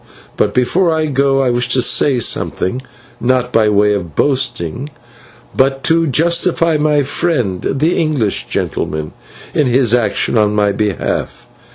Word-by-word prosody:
But - - 0
before 165 +8 +2
I 160 -1 0
go 135 -1 +1
I 125 - +1
wish 120 0 -1
to 130 - +2
say 140 -3 +3
something, 120 0 -1 0.4
not 125 0 0
by 110 -1 +3
way 105 0 +2
of 85 -7 -5
boasting, 130 - -1 0.7
but 135 0 +1
to 165 0 +2
justify 165 +2 +1
my 150 -1 +1
friend, 130 - -2
the 155 +6 0
English 145 - -1
gentleman, 75 0 -3 0.4
in 150 - +1
his 125 -2 +2
action 115 -1 +1
on 105 -1 +1
my 105 -1 +2
behalf. 105 -1 -3
130 Hz, 145 wpm, -15 LUFS, 105-150 Hz, 0.7 s, say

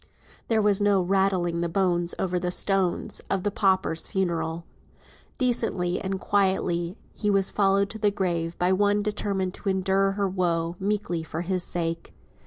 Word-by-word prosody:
There 220 -2 +2
was 205 -1 +3
no 205 -1 +4
"rattling 185 -2 +1
the 170 - -1
bones 175 -1 +1
over 180 -1 -1
the 180 0 -2
stones," 190 0 +1
of 195 -2 0
the 205 - 0
pauper's 190 -5 +1
funeral. 170 -3 -2 0.7
Decently 225 - 0
and 190 0 -3
quietly 190 -2 0 0.3
was 195 -2 +2
he - - -19
followed 200 0 +2
to 220 - -8
the 210 -1 +3
grave 170 -4 -2
by 180 +1 +2
one 205 +1 +2
determined 200 -3 -2
to 200 - -4
endure 195 +1 +1
her 200 0 0
woe 170 -3 -1
meekly 195 -4 -1
for 160 +1 -5
his 180 0 -1
sake. 165 -1 -3
190 Hz, 160 wpm, -26 LUFS, 175-200 Hz, 0.7 s, no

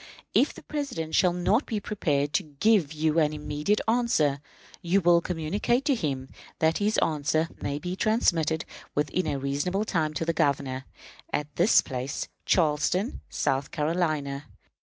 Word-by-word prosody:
If - - +4
the - - -13
President 255 - -4
shall 180 - +4
not 185 +9 +1
be 220 -3 -1
prepared 145 -9 -1
to - - +3 0.2
give 205 -9 +4
you 155 +1 +1
an 155 -1 +2
immediate 150 +7 -1
answer, 220 - +2 0.4
you 185 +2 +2
will 170 -2 +4
communicate 185 - -1
to 285 - +3
him 135 - -2 0.3
that 160 +1 +2
his 210 +1 +1
answer 155 +1 0
may 140 - -2
be 180 +4 -4
transmitted 165 -8 +1 0.3
within 150 +5 0
a 145 -2 -1
reasonable 145 +9 -1
time 155 -6 -1
to 165 - -1
the 165 - +1
Governor 135 -3 0 0.5
at 145 0 -3
this 180 +6 +5
place 130 +1 -4 0.2
(Charleston, 175 - +1
South 135 +1 -1
Carolina). 150 -3 -1
160 Hz, 150 wpm, -27 LUFS, 145-195 Hz, 0.5 s, this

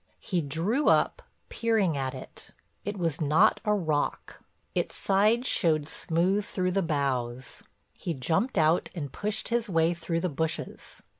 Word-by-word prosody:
He 180 -5 -1
drew 170 - +1
up, - - +2 0.3
peering 220 -8 +1
at 135 -2 -2
it—it 205 +1 -9
was 165 -4 -1
not 160 +8 +4
a 210 0 +2
rock; 155 -7 -2 0.3
its - - -2
side 215 +5 +2
showed 155 - +2
smooth 180 +6 +1
through 185 -2 -2
the 195 +2 +1
boughs. 130 -6 -2 0.3
He 170 - -4
jumped 160 - 0
out 160 +2 +3
and 145 -6 -5
pushed 210 +1 -2
his 235 -2 0
way 165 -1 +2
through 165 0 -3
the 185 - 0
bushes. 160 0 -4
170 Hz, 145 wpm, -28 LUFS, 155-205 Hz, 0.3 s, not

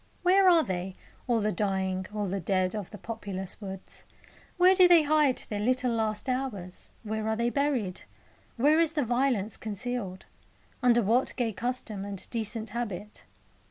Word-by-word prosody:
Where 375 +1 +6
are 335 -3 +5
they 185 -2 -4 0.3
all 235 -3 +2
the 210 +1 +1
dying, 190 -1 -1
all 210 -1 -2
the 195 +1 -2
dead, 185 +1 0
of 210 -4 -5
the 210 - -9
populous 200 -4 -6
woods? 190 -2 -7 0.5
Where 365 +1 +6
do 370 -1 +7
they 345 -3 +7
hide 295 -3 +3
their 210 - -3
little 250 +3 +1
last 215 -1 -1
hours, 250 -9 -3
where 220 0 -3
are 220 - +1
they 235 +1 0
buried? 260 -10 0 0.6
Where 295 +6 +4
is 325 -1 +2
the 295 -4 0
violence 240 -4 0
concealed? 215 -3 -4 0.6
Under 240 -2 +4
what 235 +6 +1
gay 235 -4 -1
custom 235 -3 -3
and 200 -2 -6
decent 225 -1 -3
habit? 210 -3 -5
220 Hz, 160 wpm, -28 LUFS, 200-255 Hz, 0.6 s, do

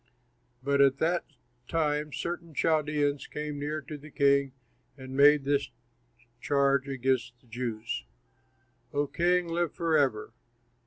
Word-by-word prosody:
But 140 +1 +2
at 135 -1 +5
that 170 +3 0 0.4
time 150 -2 0
certain 170 0 -5
Chaldeans 150 -2 +1
came 150 -1 -5
near 150 +2 -3
to 150 +1 -8
the 150 +2 -12
king 140 -1 +3 0.5
and 130 0 -8
made 145 +1 +6
this 140 0 0 0.7
charge 140 -1 +2
against 130 -2 -1
the 125 - -29
Jews: 115 - -4 0.9
"O 145 0 +1
king, 175 +4 +1
live 170 -1 -1
forever! 150 -9 +1
145 Hz, 120 wpm, -29 LUFS, 135-155 Hz, 0.9 s, made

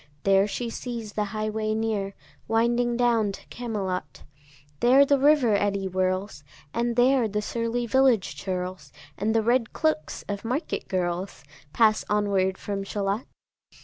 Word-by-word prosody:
There 195 0 +4
she 235 +2 -4
sees 230 -4 -6
the 210 - -1
highway 215 +1 -2
near 215 -3 -2 0.3
Winding 235 +1 +1
down 230 -4 +2
to - - -11
Camelot: 190 - -4 0.6
There 265 +3 +6
the 280 0 +3
river 280 -5 +4
eddy 200 -1 +1
whirls, 185 -3 -1 0.3
And 235 0 0
there 250 0 +4
the 210 0 -2
surly 235 +2 -2
village 240 - +3
churls, 180 -2 -5 0.2
And 215 +6 -1
the 225 - +3
red 235 0 +1
cloaks 310 - -1
of 200 +1 -4
market 255 +8 -3
girls, 180 -1 -2 0.3
Pass 215 +2 +3
onward 195 -2 +1
from 200 -1 -4
Shalott. 200 +3 -2
215 Hz, 140 wpm, -26 LUFS, 195-240 Hz, 0.6 s, There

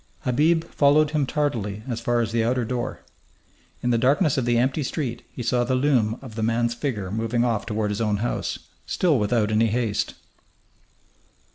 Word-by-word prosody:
Habib 155 +6 +2
followed 150 -1 +3
him 150 -3 0
tardily 115 -10 -2
as 115 -3 -3
far 120 0 +1
as 115 -1 -2
the 115 0 +1
outer 120 +1 0
door. 120 +1 -3 0.8
In 125 - +1
the 115 - +2
darkness 140 +5 +3
of 130 - 0
the 120 -1 +2
empty 130 +5 +1
street 130 -3 -3
he 120 - -6
saw 120 +1 +1
the 130 +1 0
loom 125 -5 +2
of 125 -4 -9
the 110 - -4
man's 115 +1 +1
figure 120 -7 -3
moving 115 +2 0
off 115 -3 -1
toward 105 -2 -1
his 105 - -2
own 105 -2 +1
house, 115 +4 -2 0.3
still 160 -8 +2
without 105 0 +1
any 110 +1 +3
haste. 110 -2 -1
120 Hz, 180 wpm, -24 LUFS, 110-130 Hz, 0.8 s, followed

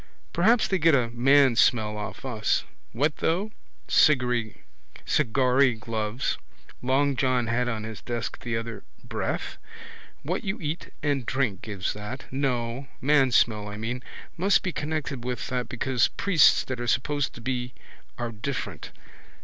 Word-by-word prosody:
Perhaps 220 +7 +4
they 190 - 0
get 160 -2 +5
a 120 -3 +1
man 135 +1 +5
smell 110 -2 +3
off 105 +5 -6
us. 110 -5 0 0.3
What 150 +4 0
though? 190 +7 0 0.4
Cigary 125 -6 +3 1.2
gloves 110 +1 -2 0.4
long 135 +2 +2
John 125 -1 +1
had 120 +2 0
on 110 -2 -3
his 110 -1 -7
desk 120 -2 -4
the 120 -2 -2
other 115 0 -5
day. - - -29 0.2
Breath? - - -3 0.6
What 175 +6 -2
you 200 +1 -3
eat 155 +1 -4
and 145 -3 +1
drink 125 -5 -1
gives 100 -4 -3
that. 105 +6 -7
No. 130 -1 -1
Mansmell, 130 -7 +3
I 105 0 -6
mean. 120 +3 -3 0.4
Must 195 +4 +3
be 185 - -1
connected 150 -5 -3
with 125 0 -3
that 125 -1 -2
because 125 0 +1
priests 175 -6 +4
that 130 -2 -5
are 120 - -3
supposed 145 +4 0
to 120 - -10
be 125 0 -3 0.4
are 120 -1 -3
different. 120 +5 -5
125 Hz, 145 wpm, -26 LUFS, 115-145 Hz, 1.2 s, get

